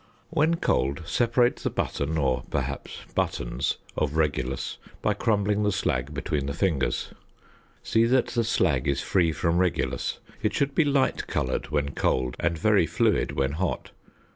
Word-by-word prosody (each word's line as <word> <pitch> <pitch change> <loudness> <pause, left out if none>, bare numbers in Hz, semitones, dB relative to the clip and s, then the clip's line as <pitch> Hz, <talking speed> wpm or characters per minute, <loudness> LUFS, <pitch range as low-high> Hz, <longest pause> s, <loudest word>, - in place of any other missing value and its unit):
When 160 +3 +3
cold 70 - 0
separate 120 - +2
the - - -2
button, 75 +3 -2
or 65 -4 +1
perhaps - - -3 0.2
buttons, - - -1 0.2
of 75 0 -1
regulus 70 -4 -1 0.2
by - - +3
crumbling 105 -2 +1
the 105 0 +2
slag 70 -8 -1
between 75 -1 -2
the 70 - -3
fingers. 80 -9 0 0.7
See 115 0 +3
that 125 +1 +3
the 120 -1 +1
slag 75 - +1
is 70 -1 +1
free 85 -4 +2
from 85 +2 +1
regulus. 65 -9 0 0.2
It - - 0
should 140 0 +1
be 165 - +3
light 140 -2 +1
coloured 65 +2 -1
when 70 -2 0
cold 65 -1 0
and 85 0 0
very - - +3
fluid - - +1
when 70 0 0
hot. 85 +3 -2
80 Hz, 155 wpm, -26 LUFS, 70-110 Hz, 0.7 s, When